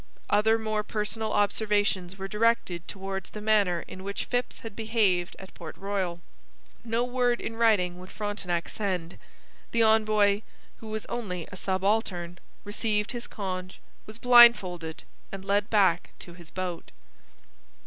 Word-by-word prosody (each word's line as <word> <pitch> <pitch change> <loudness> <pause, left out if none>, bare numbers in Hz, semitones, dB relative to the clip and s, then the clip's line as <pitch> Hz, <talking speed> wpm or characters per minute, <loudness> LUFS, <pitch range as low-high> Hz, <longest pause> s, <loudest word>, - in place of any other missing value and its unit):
Other 220 +2 +4
more 215 -1 -1
personal 215 +1 -2
observations 205 -3 +1
were 195 0 -5
directed 210 -5 +1
towards 195 -1 -5
the 215 - -8
manner 205 -5 +2
in 185 - -9
which 200 +1 -3
Phips 245 0 -2
had 225 -3 -8
behaved 215 -6 +1
at 190 - -12
Port 165 -3 -9
Royal. 190 -4 -2 0.6
No 230 +1 0
word 245 -1 +1
in 225 - -5
writing 200 -6 +2
would 185 +1 -11
Frontenac 200 -5 -3
send. 180 -5 -3 0.5
The 230 -1 +3
envoy 215 -2 +4 0.4
(who 225 - -11
was 215 0 -4
only 180 -8 -4
a - - -7
subaltern) 185 -2 -1 0.2
received 210 0 -1
his 240 -2 -5
conge, 185 -3 -5 0.3
was 215 +1 -8
blindfolded 235 -10 +5 0.3
and 195 -1 -7
led 200 +1 +1
back 190 -5 +3
to 175 - -9
his 170 -1 -13
boat. 180 -2 -5
205 Hz, 140 wpm, -27 LUFS, 185-220 Hz, 0.6 s, blindfolded